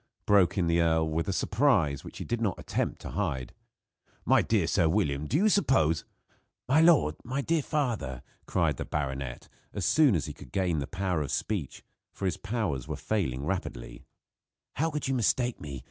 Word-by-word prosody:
broke 100 -2 +4
in 90 - +2
the 85 0 +2
earl, 80 -1 +2
with 80 +1 -1
a - - 0
surprise 95 - +2
which - - -10
he - - -5
did 120 -1 -2
not 100 -6 0
attempt - - -2
to - - -8
hide. 75 -10 -2 0.7
"My - - +5
dear - - +1
Sir 80 - +2
William, 75 -6 0
do 145 - +1
you 205 +6 +4
suppose 110 - +2 0.3
" - - -46
"My 140 +5 +4
lord! 150 - +4
My 130 +3 -2
dear 165 +2 +1
father 115 - -2
!" - - -37
cried - - +1
the - - -4
baronet, 65 -3 -4 0.3
as 95 - -2
soon 145 -8 +4
as 80 - -1
he - - -6
could 60 - -14
gain 90 -5 0
the 70 - -3
power 95 -4 -1
of 70 - -3
speech 95 -11 -3 0.3
for 100 - -6
his 90 - 0
powers 105 - -2
were - - -3
failing 70 -11 -2
rapidly, 80 -9 -4 0.7
"how 160 +3 +1
could 150 -3 -3
you 135 - 0
mistake 125 0 +1
me? 70 -3 -6
95 Hz, 195 wpm, -29 LUFS, 75-120 Hz, 0.7 s, My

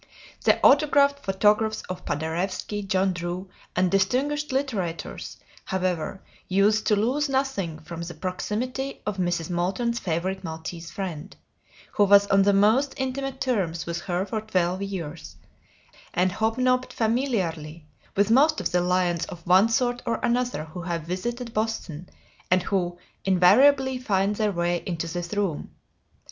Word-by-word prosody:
The - - +4
autographed 280 -1 +5
photographs 210 0 +1
of 185 0 -7
Paderewski, 175 +7 -2
John 190 -1 +1
Drew, 175 +2 -5 0.2
and 185 0 +2
distinguished 270 +10 +1
litterateurs, 210 - -3 0.3
however, 185 -1 -2 0.2
used 205 +3 +2
to 210 - +4
lose 260 +8 +1
nothing 265 - -1
from 165 +1 -8
the 170 0 -6
proximity 230 - -3
of 210 -2 -2
Mrs. 175 -2 -1
Moulton's 195 +7 -1
favorite 185 +1 -2
maltese 165 0 -6
friend, 185 -2 -6 0.6
who 205 - +3
was 200 0 +6
on 195 - +5
the 200 +1 +4
most 220 +8 +3
intimate 265 0 -3
terms 190 -11 -1
with 170 0 -3
her 180 0 -1
for 215 +2 -3
twelve 185 -3 0
years, 175 -5 -6 0.8
and 180 +1 +2
hobnobbed 255 +5 +1
familiarly 185 - -1 0.3
with 200 +2 +2
most 300 +6 +5
of - - -2
the 180 - +2
lions 180 -1 +1
of 170 -1 -10
one 185 +5 +5
sort 245 +1 +1
or 230 -1 0
another 245 -7 0
who 160 +3 -8
have 170 -2 -3
visited 230 +8 -4
Boston 210 -7 -3 0.4
and 185 0 +3
who 175 -2 -1 0.3
invariably 255 +9 +5
find 200 -4 0
their 215 -2 +1
way 175 -1 0
into 170 -2 -2
this 175 -1 -4
room. 195 -7 -2
195 Hz, 140 wpm, -25 LUFS, 175-235 Hz, 0.8 s, was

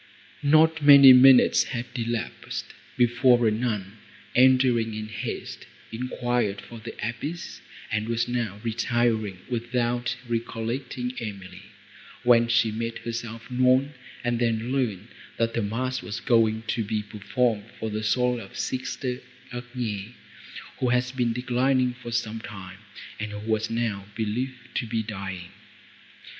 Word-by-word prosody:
Not 155 +2 +4
many 140 -2 +10
minutes 130 0 +7
had 120 0 -4
elapsed, 115 -2 -4 0.2
before 120 0 +4
a - - +3
nun, 105 -3 -3 0.4
entering 125 -3 +4
in 110 0 -5
haste, 110 - -6 0.2
enquired 120 -3 -1
for 115 - -11
the 115 +1 -8
abbess, 145 +9 -6 0.3
and 110 +1 -1
was 115 0 0 0.4
retiring, 115 -4 0
without 120 0 -1
recollecting 120 +2 -3
Emily, 100 -5 -7 0.6
when 120 -1 +5
she 115 -2 +3
made 115 +1 -3
herself 115 0 -6
known, 130 +3 +3 0.3
and 120 -1 0
then 115 0 0
learned, 115 -6 -1 0.3
that 115 0 0
a 115 - +1
mass 125 +5 -2
was 110 +2 -5
going 110 -3 +2
to 115 - 0
be 105 0 -2
performed 105 +1 -1
for 110 -1 -3
the 105 +1 -2
soul 125 +3 +1
of 95 - -11
sister 130 0 -3 0.3
Agnes, 120 -4 -5 0.7
who 125 - +1
had 125 +1 +1
been 120 -2 +1
declining, 125 +1 +1
for 120 -1 -9
some 115 -1 -2
time, 95 -3 -9 0.4
and 105 0 -4
who 105 - -5
was 110 0 0
now 110 -4 -2
believed 125 +4 -4
to 120 - -2
be 110 0 -1
dying. 95 -4 -6
120 Hz, 130 wpm, -26 LUFS, 110-125 Hz, 0.7 s, many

